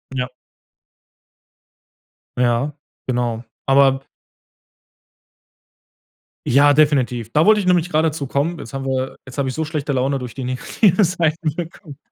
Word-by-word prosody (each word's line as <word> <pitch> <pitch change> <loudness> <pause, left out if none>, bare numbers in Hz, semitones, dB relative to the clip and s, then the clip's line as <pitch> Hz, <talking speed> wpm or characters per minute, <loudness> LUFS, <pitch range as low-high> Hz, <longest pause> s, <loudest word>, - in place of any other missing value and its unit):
Ja. 125 -1 -1 2.1
Ja 125 +4 +1 0.3
genau. 120 -2 -1 0.2
Aber 135 0 +4 2.4
Ja, 145 +3 +5
definitiv. 130 -6 +2
Da 155 +4 +3
wollte 215 -1 +5
ich - - -5
nämlich 175 -1 +3
grade 160 0 +2
dazukommen. 150 +2 -2
Jetzt 125 - -9
haben 135 0 -4
wir 130 0 -2
jetzt 130 +2 -11
habe 140 -1 0
ich 130 - -3
so 160 - -1
schlechte 150 -2 -3
Laune 135 +1 0
durch 125 -2 -8
die 130 - -5
negative 165 - +1
Seiten 165 -3 -1
bekommen. 165 -4 -8
140 Hz, 130 wpm, -20 LUFS, 130-160 Hz, 2.4 s, Ja